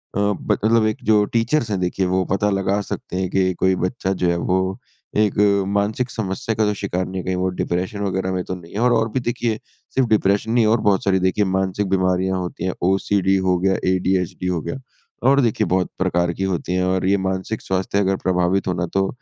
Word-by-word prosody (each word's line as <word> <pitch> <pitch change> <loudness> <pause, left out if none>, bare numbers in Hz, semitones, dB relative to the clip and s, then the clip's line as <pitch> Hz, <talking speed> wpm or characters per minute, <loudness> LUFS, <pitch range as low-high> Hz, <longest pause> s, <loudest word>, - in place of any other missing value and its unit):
अ, - - 0
ब 100 -1 0
मतलब 110 0 +4
एक 110 - -1
जो 105 -1 +4
टीचर्स 115 +1 +1
हैं 95 - 0
देखिए 90 +1 0
वो 95 +1 +1
पता 105 +1 +2
लगा 95 +1 0
सकते 90 - -4
हैं 95 -1 -1
कि 95 -1 +1
कोई 95 0 +4
बच्चा 95 +1 -2
जो 85 - +3
है 85 - +1
वो 95 +2 0 0.4
एक 105 -1 +2
अ, 100 -1 +3
मानसिक 105 +5 0
समस्या 105 +1 -3
का 110 - +2
तो 105 - +1
शिकार 95 -2 -2
नहीं, 95 0 -4
कहीं 95 0 -1
वो 95 0 0
डिप्रेशन 90 +3 -2
वगैरह 95 -1 -1
में 90 -1 -1
तो 95 - -4
नहीं 85 +2 -12
और 120 +1 +3
और 115 0 +2
भी 130 - 0
देखिए 120 -2 -2 0.4
सिर्फ़ 130 -3 +3
डिप्रेशन 105 +1 +2
नहीं 120 -2 +3
और 110 +1 +3
बहुत 95 - +1
सारी 95 -1 +2
देखिए 95 +3 +1
मानसिक 95 +1 -1
बीमारियाँ 95 0 +1
होती 90 0 -5
हैं। 95 - -1 0.2
ओसीडी 95 0 +2
हो 90 -1 +3
गया 95 +1 +2 0.2
एडीएचडी 90 -1 -1
हो 90 -3 -1
गया - - -4 0.5
और 140 0 +5
देखिए 115 -3 +1
बहुत 90 0 +1
प्रकार 85 0 +1
की 95 - -4
होती 90 -1 -2
हैं। 90 0 +1
और 95 0 0
ये 100 +1 +3
मानसिक 95 +4 -3
स्वास्थ्य 95 +1 -1
अगर 95 -1 +2
प्रभावित 90 +1 +1
हो 90 - +1
ना 90 0 -1
तो 95 0 +2
95 Hz, 220 wpm, -21 LUFS, 95-105 Hz, 0.5 s, और